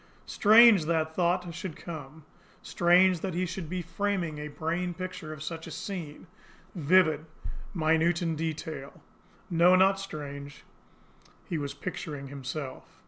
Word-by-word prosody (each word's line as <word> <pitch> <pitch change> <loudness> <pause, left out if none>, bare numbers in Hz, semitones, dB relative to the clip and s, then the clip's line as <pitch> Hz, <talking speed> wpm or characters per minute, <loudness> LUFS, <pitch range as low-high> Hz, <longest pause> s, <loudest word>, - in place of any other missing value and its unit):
Strange 215 -4 +6
that 160 -1 0
thought 175 -1 0
should 170 -1 -6
come! 155 -2 -9 0.4
Strange 180 +1 +4
that 185 0 -4
he 180 +1 0
should 170 -2 -6
be 180 0 -3
framing 170 -2 -2
a 150 - -5
brain 170 +4 -3
picture 185 -3 -6
of 155 -1 -7
such 165 0 -6
a - - -7
scene, 170 -7 -6 0.5
vivid, 160 -2 +3 0.5
minute 165 +1 +2
in 165 -2 -1
detail! 155 -3 -5 0.5
No 175 +2 +6
not 190 +1 +4
strange. 145 -6 -8 0.8
He 165 - -3
was 140 -1 -4
picturing 145 -3 -6
himself. 135 0 -7
165 Hz, 135 wpm, -28 LUFS, 155-185 Hz, 0.8 s, Strange